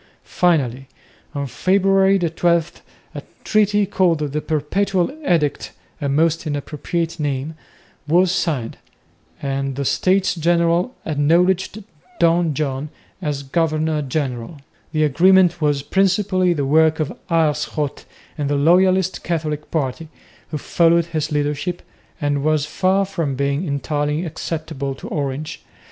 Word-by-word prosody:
Finally, 135 -7 0 0.5
on 140 0 -2
February 195 - +3
12, 170 -1 0 0.3
a - - -6 0.2
treaty 210 -1 +2
called 185 -4 +2
"The 150 +2 -2
Perpetual 180 - 0
Edict," 155 - 0 0.3
a 140 - -1
most 160 +3 +1
inappropriate 155 +3 -3
name, 145 +1 -2 0.5
was 175 +3 +4
signed, 145 -11 -1 0.7
and 135 -1 -2
the 140 +1 -3
States 190 +6 +2
General 170 +6 +1
acknowledged 175 +7 +1 0.4
Don 170 -2 +3
John 140 0 -2 0.3
as 145 -4 -3
governor 155 +1 0
general. 135 0 -3 0.3
The 155 0 +1
agreement 175 +4 +4
was 145 -2 +1
principally 190 +1 +2
the 145 -4 -1
work 160 +3 +3
of 155 - -2
Aerschot 150 -3 0 0.3
and 145 -1 -1
the 145 - +1
loyalist 185 +5 +3
Catholic 155 -3 -3
party, 155 0 -2 0.4
who 155 - -3
followed 170 +3 +2
his 155 0 -1
leadership, 150 +4 -2 0.4
and 145 -2 0
was 155 -1 +2
far 190 +5 +1
from 165 -8 -2
being 140 +5 -1
entirely 145 +3 -1
acceptable 155 -4 -4
to - - -9
Orange. 145 +2 -4
160 Hz, 120 wpm, -20 LUFS, 145-175 Hz, 0.7 s, was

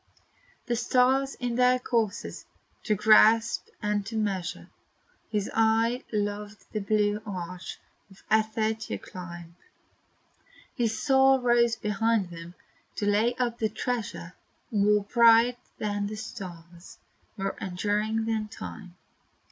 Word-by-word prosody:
The 240 - 0
stars 260 +3 +2
in 245 -2 -3
their 250 0 +5
courses 230 -4 -2 0.4
to 215 - +2
grasp 220 +2 +5 0.2
and 210 0 0
to 225 0 -4
measure, 195 -5 -3 0.6
His 210 -2 -1
eye 225 +2 +2
loved 205 0 -3
the 215 - -2
blue 210 0 +1
arch 185 -3 -6 0.3
of 195 - -19
ether 220 0 +2
to 220 0 -5
climb; 175 -2 -10 1.2
His 230 -4 -1
soul 270 0 +4
rose 240 -1 +3
beyond 210 -2 0
them 170 +1 -10 0.4
to 205 - -2
lay 215 +4 +2
up 240 -2 -2
a 220 - +2
treasure 235 0 -4 0.4
More 210 -1 +3
bright 235 +2 +5 0.2
than 205 -1 -2
the 215 - -5
stars, 175 -5 -9 0.4
more 195 0 -2
enduring 210 +4 -1
than 220 -1 -1
time. 190 -4 -9
215 Hz, 120 wpm, -27 LUFS, 205-230 Hz, 1.2 s, their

